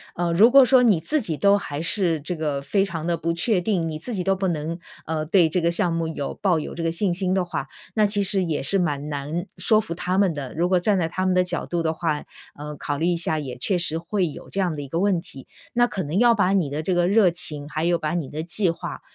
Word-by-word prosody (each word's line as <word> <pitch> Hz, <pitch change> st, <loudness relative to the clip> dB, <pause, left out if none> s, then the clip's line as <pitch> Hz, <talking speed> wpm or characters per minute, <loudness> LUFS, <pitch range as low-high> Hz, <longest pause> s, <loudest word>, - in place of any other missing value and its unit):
呃， 175 Hz, 0 st, -1 dB
如 200 Hz, +8 st, +6 dB
果 275 Hz, +2 st, +8 dB
说 255 Hz, 0 st, +5 dB
你 210 Hz, -9 st, +3 dB
自 300 Hz, -, 0 dB
己 170 Hz, -8 st, -3 dB
都 200 Hz, +5 st, +4 dB
还 145 Hz, -6 st, -5 dB
是 170 Hz, -3 st, 0 dB
这 175 Hz, +4 st, -5 dB
个 150 Hz, -3 st, -2 dB
非 195 Hz, +7 st, +1 dB
常 165 Hz, -5 st, -5 dB
的 170 Hz, 0 st, 0 dB
不 170 Hz, 0 st, -1 dB
确 185 Hz, +4 st, +1 dB
定， 180 Hz, -3 st, -1 dB
你 155 Hz, -1 st, -5 dB
自 240 Hz, +9 st, -6 dB
己 185 Hz, -4 st, -2 dB
都 195 Hz, -, +2 dB
不 190 Hz, 0 st, -1 dB
能， 165 Hz, 0 st, -3 dB, 0.3 s
呃， 155 Hz, -1 st, -2 dB
对 170 Hz, 0 st, +4 dB
这 180 Hz, -, 0 dB
个 170 Hz, 0 st, +1 dB
项 170 Hz, 0 st, +1 dB
目 165 Hz, 0 st, -1 dB
有 150 Hz, -3 st, -4 dB
抱 185 Hz, -4 st, +2 dB
有 -, -, -6 dB
这 170 Hz, -, -5 dB
个 165 Hz, -, +1 dB
信 180 Hz, +1 st, 0 dB
心 185 Hz, +1 st, 0 dB
的 190 Hz, -1 st, +1 dB
话， 165 Hz, -6 st, -4 dB, 0.3 s
那 215 Hz, -, +4 dB
其 205 Hz, 0 st, +1 dB
实 190 Hz, -1 st, +2 dB
也 155 Hz, -4 st, -2 dB
是 195 Hz, +8 st, +3 dB
蛮 150 Hz, -4 st, -2 dB
难 150 Hz, +4 st, -4 dB
说 215 Hz, -2 st, +3 dB
服 170 Hz, -, -5 dB
他 180 Hz, +2 st, -2 dB
们 195 Hz, -4 st, +3 dB
的， 140 Hz, -4 st, -6 dB
如 175 Hz, +3 st, 0 dB
果 185 Hz, -1 st, +3 dB
站 200 Hz, +3 st, +2 dB
在 165 Hz, -3 st, 0 dB
他 185 Hz, +2 st, -2 dB
们 185 Hz, -1 st, +2 dB
的 180 Hz, -, +4 dB
角 180 Hz, -, -3 dB
度 170 Hz, -1 st, -2 dB
的 160 Hz, -, +1 dB
话， 160 Hz, -2 st, -2 dB, 0.3 s
呃， 150 Hz, 0 st, -7 dB
考 145 Hz, +1 st, -3 dB
虑 160 Hz, -, -1 dB
一 175 Hz, -1 st, +1 dB
下 160 Hz, -2 st, +2 dB
也 130 Hz, -4 st, -6 dB
确 180 Hz, +9 st, +1 dB
实 170 Hz, -2 st, +3 dB
会 180 Hz, +3 st, -1 dB
有 -, -, -11 dB
这 195 Hz, -, -1 dB
样 180 Hz, -3 st, 0 dB
的 150 Hz, -, -5 dB
一 140 Hz, -, -7 dB
个 165 Hz, +5 st, -2 dB
问 195 Hz, -3 st, +2 dB
题。 135 Hz, -7 st, -11 dB, 0.3 s
那 240 Hz, 0 st, +4 dB
可 205 Hz, -5 st, -4 dB
能 155 Hz, +1 st, -3 dB
要 240 Hz, +2 st, +5 dB
把 200 Hz, -4 st, +2 dB
你 180 Hz, -7 st, +1 dB
的 145 Hz, +2 st, -3 dB
这 180 Hz, +4 st, -1 dB
个 175 Hz, 0 st, +2 dB
热 205 Hz, -2 st, +5 dB
情， 150 Hz, -4 st, -2 dB
还 155 Hz, +1 st, -3 dB
有 170 Hz, 0 st, +2 dB
把 150 Hz, 0 st, -2 dB
你 165 Hz, -6 st, -3 dB
的 155 Hz, -, -5 dB
计 175 Hz, +3 st, 0 dB
划， 165 Hz, -, -7 dB
175 Hz, 305 characters per minute, -23 LUFS, 155-190 Hz, 0.3 s, 果